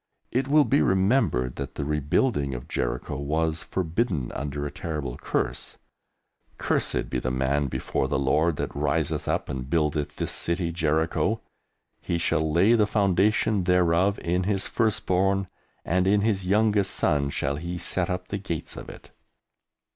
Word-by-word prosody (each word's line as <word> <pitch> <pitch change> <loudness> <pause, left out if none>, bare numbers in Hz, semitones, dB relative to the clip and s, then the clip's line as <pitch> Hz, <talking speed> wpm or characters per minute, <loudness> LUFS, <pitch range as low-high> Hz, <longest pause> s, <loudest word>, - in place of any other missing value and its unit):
It 130 +2 0
will 150 +1 +5
be 140 - +3
remembered 95 - +2
that 70 0 -5
the - - -3
rebuilding 75 - 0
of - - -7
Jericho - - -2
was 80 +3 -1
forbidden 85 - -1
under 70 +1 -4
a 70 - -4
terrible 75 -6 -4
curse, - - -3 0.8
"Cursed - - 0
be 65 - -2
the 65 - -2
man 65 +2 0
before 65 0 -2
the - - 0
Lord 75 +5 +2
that - - -4
riseth - - 0
up - - 0
and 65 0 -5
buildeth 75 -2 0
this - - -2
city 85 0 -1
Jericho; 80 -1 0 0.6
he 85 - -1
shall 80 -2 +1
lay 95 +8 +4
the 110 -3 +4
foundation 100 0 +2
thereof 90 +2 +3
in 90 +2 0
his 100 0 0
firstborn, 95 -3 +1 0.4
and 90 +2 +1
in 100 +1 +4
his 100 -4 0
youngest 105 0 +2
son 70 -2 +1
shall 70 - -1
he 85 +3 -4
set 85 +1 -1
up 90 0 -3
the 100 - -3
gates 85 -6 -5
of - - -8
it." - - -13
85 Hz, 155 wpm, -26 LUFS, 75-100 Hz, 0.8 s, will